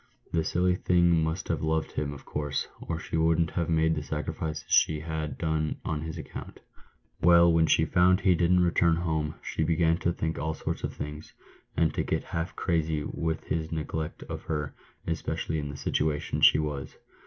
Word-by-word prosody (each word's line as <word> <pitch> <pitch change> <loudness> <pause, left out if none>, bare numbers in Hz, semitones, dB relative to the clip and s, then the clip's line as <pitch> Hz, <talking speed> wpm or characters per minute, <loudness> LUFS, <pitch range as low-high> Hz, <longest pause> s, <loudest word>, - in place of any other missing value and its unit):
"The 80 -1 +2
silly 90 +2 +1
thing 85 -3 +3
must 80 +3 -2
have - - 0
loved 80 0 0
him, 75 -1 -2
of 70 -1 -10
course, 75 -1 -2
or 80 - -3
she 80 - -4
wouldn't 80 0 +2
have 85 -2 -1
made 80 0 +3
the 75 - -2
sacrifices 75 +1 -4
she 75 -1 +3
had 80 -1 -4
done 80 -1 -1
on 75 -2 -2
his 80 +1 -5
account. 80 - -8 0.6
Well, 85 0 +6
when 80 -1 +4
she 80 - +4
found 90 +3 +4
he 95 -1 +4
didn't 90 +1 +3
return 85 -1 +3
home, 80 -3 -1
she - - -3
began 80 +1 +2
to 85 - +1
think 80 -2 -3
all 80 +1 -2
sorts - - -4
of - - -3
things, 75 +1 -7 0.4
and 80 -2 +3
to - - 0
get - - -1
half 80 +2 -4
crazy 80 -4 0
with 80 +1 -3
his 80 -1 -2
neglect 80 0 -4
of - - -6
her, 75 -3 -3 0.3
especially 80 -1 -2
in 75 -1 -4
the 70 - -7
situation 75 0 -1
she - - +7
was. 75 -3 -3
80 Hz, 190 wpm, -28 LUFS, 75-85 Hz, 0.6 s, she